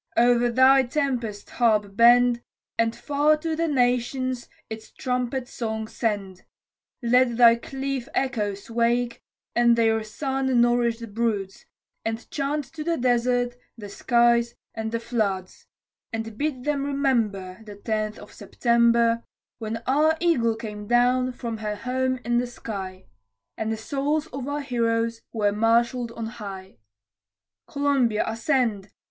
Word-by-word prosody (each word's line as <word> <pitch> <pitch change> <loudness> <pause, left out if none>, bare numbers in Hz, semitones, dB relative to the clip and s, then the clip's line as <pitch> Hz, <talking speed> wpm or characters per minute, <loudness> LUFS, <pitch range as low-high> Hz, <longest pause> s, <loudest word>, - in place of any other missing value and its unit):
O'er 240 0 +4
thy 260 +3 +6
tempest 250 -6 -2
harp 210 -4 +1
bend, 240 +1 +5 0.3
And 230 0 +1
far 295 +1 +2
to 320 +1 -3
the 330 +1 0
nations 250 -1 0 0.2
its 220 0 -8
trumpet 250 0 -2
song 220 -2 -4
send, 200 -5 -3 0.6
Let 240 0 +3
thy 235 -1 +8
cliff 270 0 -4
echoes 210 -6 -2
wake, 235 +1 0 0.3
with 240 0 +5
their 225 -1 +2
sun 265 +3 -1
nourish'd 235 -2 +1
broods, 210 -4 -2 0.4
And 225 +1 -4
chant 290 +1 -1
to 310 -1 -5
the 335 +1 0
desert 245 0 +1 0.2
the 205 -2 -8
skies 235 +2 +2 0.2
and 220 0 -4
the 230 - -1
floods, 205 -6 -3 0.4
And 225 -1 -5
bid 275 0 -2
them 290 -1 0
remember, 230 -10 -1
The 210 -2 -10
Tenth 215 +1 -2
of - - -13
September, 235 -1 +2 0.4
When 225 0 -4
our 305 +5 +3
Eagle 245 -10 +2
came 210 -2 -7
down 250 +2 +3
from 235 -2 -5
her 210 -1 -3
home 255 +3 -1
in 240 0 +2
the 245 - -1
sky 190 -6 -7 0.5
And 220 0 -2
the 220 - -2
souls 285 +6 -1
of 265 0 -5
our 290 +1 -2
heroes 230 -3 -1
were 210 -3 +1
marshall'd 230 +3 +1
on 230 -1 -5
high. 195 -4 -8 0.9
Columbia, 275 -6 +1
ascend! 225 -4 0
235 Hz, 135 wpm, -25 LUFS, 220-255 Hz, 0.9 s, thy